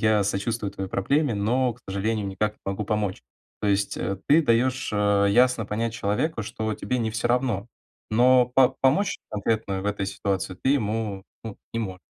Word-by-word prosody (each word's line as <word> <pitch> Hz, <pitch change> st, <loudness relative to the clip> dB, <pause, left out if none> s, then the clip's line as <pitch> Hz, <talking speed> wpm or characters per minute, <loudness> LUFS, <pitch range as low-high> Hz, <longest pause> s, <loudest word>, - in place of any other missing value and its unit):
я 110 Hz, -1 st, +4 dB
сочувствую 100 Hz, +1 st, -2 dB
твоей 95 Hz, -1 st, -5 dB
проблеме, 140 Hz, +7 st, +1 dB
но, 120 Hz, +5 st, +1 dB
к 125 Hz, -, -23 dB
сожалению, 105 Hz, +2 st, -1 dB
никак 105 Hz, +3 st, -1 dB
не -, -, -35 dB
могу 100 Hz, +2 st, -2 dB
помочь". 105 Hz, -2 st, -2 dB, 0.4 s
То -, -, -1 dB
есть, 100 Hz, 0 st, +1 dB
э, 95 Hz, -1 st, -2 dB
ты 160 Hz, +3 st, +6 dB
даешь, 130 Hz, +1 st, +1 dB
э, 100 Hz, -1 st, +3 dB
ясно 125 Hz, 0 st, +3 dB
понять 115 Hz, +2 st, -2 dB
человеку, 110 Hz, +5 st, -1 dB
что 110 Hz, +1 st, -3 dB
тебе 125 Hz, +5 st, -2 dB
не 110 Hz, -1 st, -1 dB
всё 115 Hz, +2 st, -1 dB
равно, 120 Hz, -5 st, 0 dB, 0.4 s
но 125 Hz, +2 st, +5 dB
по 130 Hz, -2 st, +6 dB
помочь 150 Hz, +10 st, +2 dB
конкретно 105 Hz, -2 st, -1 dB
в 100 Hz, -, -4 dB
этой 100 Hz, -1 st, -1 dB
ситуации 95 Hz, -1 st, -2 dB
ты 130 Hz, -, +2 dB
ему, 110 Hz, -6 st, -1 dB, 0.2 s
ну, 110 Hz, -3 st, -7 dB, 0.2 s
не 115 Hz, -, -1 dB
мо. 95 Hz, -4 st, -4 dB
110 Hz, 185 wpm, -25 LUFS, 100-120 Hz, 0.4 s, ты